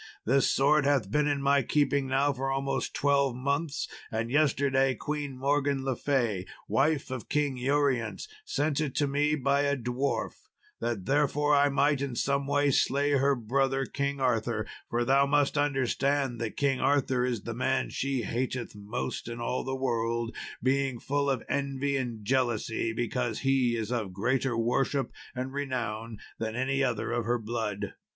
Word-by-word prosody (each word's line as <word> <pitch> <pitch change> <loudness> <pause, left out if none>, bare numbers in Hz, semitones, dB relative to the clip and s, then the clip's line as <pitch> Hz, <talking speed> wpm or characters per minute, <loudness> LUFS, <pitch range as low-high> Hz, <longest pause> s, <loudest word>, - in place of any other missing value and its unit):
This 135 +4 +3
sword 145 +2 +4
hath 130 -9 +1
been 150 +3 +2
in 145 -1 0
my 140 0 +4
keeping 140 +1 +1
now 135 +2 +2
for 135 0 -3
almost 135 0 -1
twelve 140 -3 +2
months, 140 +4 -1 0.2
and 115 +1 -2
yesterday 135 -2 +2
Queen 145 0 -4
Morgan 140 0 +1
le 135 -2 0
Fay, 120 -11 0 0.2
wife 140 -1 +1
of 130 -3 -5
King 145 -2 +1
Urience, 135 - 0 0.2
sent 155 - 0
it 145 -4 -2
to 145 - +2
me 145 +2 +2
by 140 0 +2
a 140 0 +1
dwarf, 125 +3 -2 0.3
that 115 -6 -2
therewith 145 +2 +2
I 145 0 +4
might 140 0 +2
in 135 -3 -3
some 140 +2 0
way 145 0 +2
slay 140 +2 +2
her 140 0 +3
brother, 135 +3 0
King 140 +2 -2
Arthur; 115 -3 0 0.2
for 120 +1 0
thou 135 +2 +4
must 145 0 +2
understand 135 -2 0
that 115 -2 -4
King 135 -2 +1
Arthur 135 -3 +2
is 120 -5 -1
the 115 - -4
man 130 +3 0
she 135 -3 -1
hateth 120 +2 -3
most 105 +3 -4
in 120 0 -5
all 120 +2 -2
the 130 0 -3
world, 115 -3 -1 0.3
being 135 -1 +1
full 140 +2 0
of 130 -4 0
envy 140 0 -1
and 120 -5 -3
jealousy 115 -2 0
because 120 0 -2
he 135 -3 +2
is 110 0 -3
of 110 -7 -2
greater 120 +5 0
worship 135 +4 0 0.2
and 130 +1 -4
renown 115 -5 -3 0.2
than 110 0 -3
any 135 +2 0
other 115 -4 -1
of 120 -1 -1
her 120 +2 +1
blood. 105 -3 -3
135 Hz, 165 wpm, -29 LUFS, 120-140 Hz, 0.3 s, sword